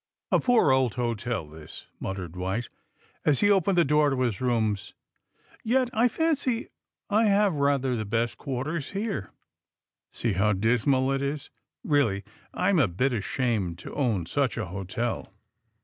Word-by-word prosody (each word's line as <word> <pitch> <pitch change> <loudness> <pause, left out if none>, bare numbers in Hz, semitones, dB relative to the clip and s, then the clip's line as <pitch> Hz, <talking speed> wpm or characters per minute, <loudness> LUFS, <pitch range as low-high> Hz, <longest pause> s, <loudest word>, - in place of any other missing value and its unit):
^^A - - +3
poor 245 - +4
old 130 -4 +2
hotel, 115 -6 -2
this,'' 75 0 -11
muttered 95 -3 -5
White, 95 +6 -2 0.5
as 145 - +3
he 205 - +5
opened 195 -1 +3
the 170 - +5
door 150 +1 +4
to 135 -2 -1
his 120 -5 -1
rooms. 110 -5 0 0.7
^^Yet 250 +2 +2
I 230 +3 +4
fancy 290 0 +1
52 - - -25 0.4
THE - - +1
SUBMARINE 225 - +4
BOYS - - +4
I - - +4
have 205 -2 +3
rather 140 -3 +1
the 110 -2 -3
best 115 +3 -1
quarters 140 +3 -3
here. 200 - -3 0.8
See 115 -3 -2
how 105 +3 +2
dismal 125 +6 +2
it 135 0 0
is. 140 +1 -3 0.3
Really, 115 -10 +1 0.3
I'm 195 - +2
a 130 - +4
bit 125 +10 0
ashamed 105 -5 -1
to - - -9
own 115 - 0
such 135 - 0
a 110 - -2
hotel. 95 +6 -4
125 Hz, 165 wpm, -27 LUFS, 105-150 Hz, 0.8 s, he